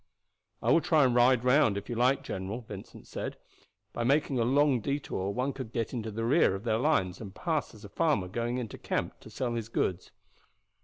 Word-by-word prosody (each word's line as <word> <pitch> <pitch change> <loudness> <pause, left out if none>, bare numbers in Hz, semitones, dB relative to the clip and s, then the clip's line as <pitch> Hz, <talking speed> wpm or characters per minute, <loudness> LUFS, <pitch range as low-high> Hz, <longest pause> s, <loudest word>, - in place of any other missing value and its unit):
"I - - +3
will 165 - +5
try 155 -4 +4
and 125 - +2
ride 125 0 +4
round, 125 -5 +4
if 100 - -6
you - - -3
like, 125 +4 +2
general," 95 +6 -4
Vincent 105 -4 -10
said. - - -5 0.6
"By 120 - -2
making 140 0 +2
a - - +3
long 135 +1 +3
detour 140 -8 -2
one 125 +6 -1
could 130 -5 -7
get 115 +1 -2
into 115 -3 -3
the 115 +2 -3
rear 120 - +4
of 95 - -7
their 110 -2 +1
lines 95 - +1
and 100 -3 -8
pass 160 -8 -2
as 105 0 -12
a - - -10
farmer 145 - +1
going 120 +5 -2
into 120 -4 -5
camp - - -3
to - - -13
sell 125 -2 -2
his 115 -1 -4
goods." 90 -5 -1
120 Hz, 210 wpm, -29 LUFS, 105-135 Hz, 0.6 s, will